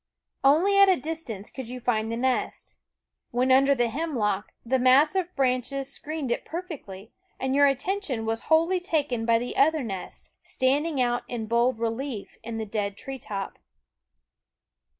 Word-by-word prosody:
Only 345 +9 +4
at 395 -1 +8
a 375 - +5
distance 260 - -6
could 260 -4 -7
you 250 0 -6
find 225 -2 0
the 230 - -2
nest. 255 +1 -1 0.5
When 250 +2 +1
under 275 +2 +5
the 240 -2 +2
hemlock, 225 -8 -2
the 260 +2 +1
mass 265 +5 +5
of 365 -2 -2
branches 265 +1 -1
screened 305 -4 -4
it - - -1
perfectly, 285 - -7 0.3
and 265 0 -1
your 285 +1 +6
attention 275 - -1
was 225 0 -1
wholly 330 +3 +4
taken 290 -10 -1
by 230 0 +5
the 245 +2 -4
other 305 +1 +3
nest, 195 -5 -7
standing 295 -3 0
out 240 -1 +1
in 235 -3 -4
bold 235 +2 +2
relief 230 0 -4
in 230 0 -5
the 220 - -3
dead 200 -1 -3
tree 270 -1 -7
top. 200 -4 -6
260 Hz, 160 wpm, -26 LUFS, 230-305 Hz, 0.5 s, at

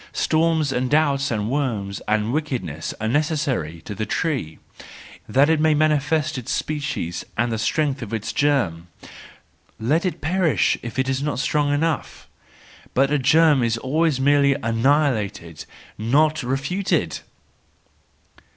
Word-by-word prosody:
Storms 160 -2 +1
and 125 0 -1
doubts 145 -2 +2
and 105 -3 -2
worms 110 -9 -2
and 110 +2 0
wickedness 130 - -3
are 110 - -2
necessary 140 - -1
to 105 - -7
the 105 - -4
tree, 125 - -2 0.7
that 140 +2 +4
it 160 -1 +2
may 155 0 +3
manifest 155 -1 +1
its 125 0 -6
species 145 - -3
and 120 +1 +1
the 110 - -2
strength 145 +1 0
of 115 -3 -7
its 110 -1 -3
germ; 120 - 0 0.9
let 145 +10 +1
it 185 - -2
perish 170 +1 +1
if 120 +1 -7
it 130 0 +1
is 135 0 -1
not 145 -2 -2
strong 145 +2 +1
enough! 155 +1 -2 0.7
But 135 +2 +3
a 150 - +2
germ 150 +1 +4
is 115 -1 +1
always 145 +3 0
merely 140 0 +4
annihilated,—not 125 - 0
refuted 140 +10 -1
140 Hz, 135 wpm, -22 LUFS, 115-155 Hz, 0.9 s, that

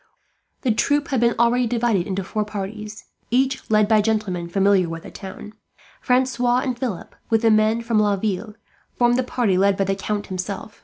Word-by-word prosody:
The 255 - +1
troop 290 +6 +1
had 265 -3 +1
been 235 0 +2
already 235 +1 +3
divided 230 -6 0
into 195 0 -2
four 210 +3 -2
parties, 210 0 -7 0.2
each 265 +2 0
led 215 -1 +4
by 215 -1 +4
gentlemen 205 -6 -1
familiar 195 -1 +2
with 165 0 -6
the - - -10
town. 210 +2 -9 0.5
Francois 250 -1 +2
and 255 -2 -2
Philip, 240 -7 -5 0.2
with 225 0 +2
the 225 - +5
men 215 +2 +2
from 230 -2 +1
Laville, 205 0 -1 0.4
formed 240 0 +3
the - - +4
party 235 -7 0
led 195 0 +3
by 195 - +2
the 195 0 0
Count 205 +1 -3
himself. 195 +2 -6
215 Hz, 185 wpm, -22 LUFS, 195-240 Hz, 0.5 s, the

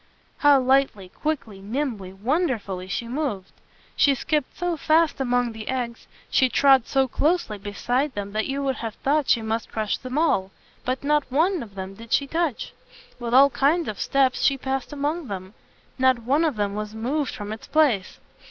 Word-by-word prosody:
"] - - -37
How 290 -2 +6
lightly, 260 -7 +2
quickly, 225 -6 -4
nimbly, 215 -3 -3
wonderfully, 210 - -1
she 230 +5 -3
moved! 240 -8 -3 0.4
She 280 -1 +4
skipped 300 +1 -2
so 355 0 -1
fast 315 -1 +2
among 245 -2 +1
the 220 -1 -9
eggs, 245 -3 -3 0.2
she 260 - +3
trod 270 -2 +4
so 270 -1 +2
closely 290 - 0
beside 245 +7 -1
them, 200 -1 -4
that 215 +1 -1
you 275 +1 -2
would 270 -1 -1
have 225 -2 -5
thought 290 +1 0
she 230 - +3
must 220 0 -3
crush 215 -2 -1
them 255 +2 -5
all. 250 - +2 0.4
But 255 +2 -2
not 295 -2 +1
one 335 +5 +2
of 205 -4 -10
them 190 0 -6
did 230 +3 -8
she 280 - +3
touch. 320 -3 -2 0.5
With 240 0 -1
all 275 +1 +7
kinds 315 +6 +2
of 210 - -5
steps 270 -2 +2
she 275 - +3
passed 265 +1 -3
among 295 +2 -2
them. 190 -1 -6 0.5
Not 260 -2 +3
one 285 +7 +2
of 305 -6 0
them 205 -1 -1
was 210 +1 -5
moved 270 +6 -2
from 210 -2 -5
its 220 - -10
place. 270 -12 +2
255 Hz, 185 wpm, -24 LUFS, 215-290 Hz, 0.5 s, all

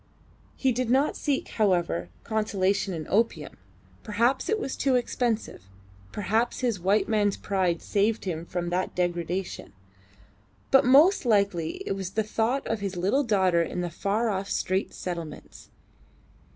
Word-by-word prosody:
He 265 - +1
did 250 0 -1
not 270 +4 +2
seek, 285 -3 -1
however, 180 -6 0
consolation 200 -3 0
in 160 -3 -4
opium 225 +3 0 0.4
perhaps 235 +5 0
it 435 0 +1
was 270 - -3
too 265 -2 +1
expensive 235 - -1 0.4
perhaps 220 +5 -1
his 235 -6 0
white 195 +4 +2
man's 205 -3 +1
pride 185 -4 -1
saved 210 +2 0
him 165 -3 -3
from 175 -1 -3
that 185 +1 -1
degradation; 175 - -2 1.0
but 270 - +6
most 300 +10 +6
likely 200 -8 +1
it - - -3
was 195 -1 -4
the 220 - +1
thought 225 +5 -1
of 225 - -2
his 200 -2 -4
little 200 +11 +2
daughter 190 -7 +2
in 175 +2 -2
the 175 -1 -3
far 210 +7 0
off 195 0 -3
Straits 190 +2 -1
Settlements. 170 -3 -7
200 Hz, 145 wpm, -26 LUFS, 180-235 Hz, 1.0 s, but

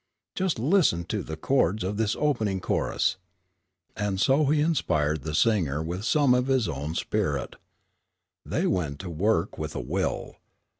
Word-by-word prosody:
Just 185 -3 -1
listen 135 - +3
to 105 +4 -3
the 80 -2 -6
chords 105 -1 +1
of 100 +3 -2
this 110 -1 +1
opening 110 -10 0
chorus." 95 - 0 0.8
And 100 -2 -2
so 135 +7 +3
he 150 +2 +2
inspired 80 - +1
the 75 +2 -4
singer 80 -9 +2
with 90 +6 -4
some 140 0 +4
of 125 +1 +1
his 130 -4 +2
own 75 +1 -4
spirit. - - -1 0.9
They - - -1
went 75 -6 -1
to 90 - -6
work 95 +2 0
with 75 0 -4
a - - -2
will. - - -3
100 Hz, 155 wpm, -26 LUFS, 80-130 Hz, 0.9 s, some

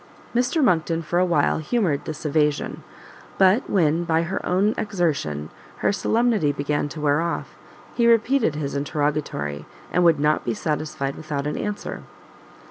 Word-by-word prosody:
Mr 250 +6 +1
Monckton 165 -5 +2
for 175 +3 0
a 185 - +4
while 165 -5 +2
humoured 160 - 0
this 155 0 -6
evasion; 150 -1 0 0.6
but 195 +6 +4
when, 165 -3 +2
by 165 -1 +1
her 180 +3 -3
own 195 +4 +2
exertion, 150 - -2 0.3
her - - +5
solemnity 220 -6 +1
began 145 +1 -1
to 155 - -8
wear 150 +1 +2
off, 170 0 -3 0.4
he 235 -1 +2
repeated 230 - +3
his 145 -2 -3
interrogatory, 140 - -2 0.3
and 180 - +3
would 165 -3 +5
not 150 +1 +2
be 115 - -2
satisfied 150 0 -2
without 150 -3 -4
an 150 - -2
answer. 210 0 -4
155 Hz, 150 wpm, -23 LUFS, 145-190 Hz, 0.6 s, her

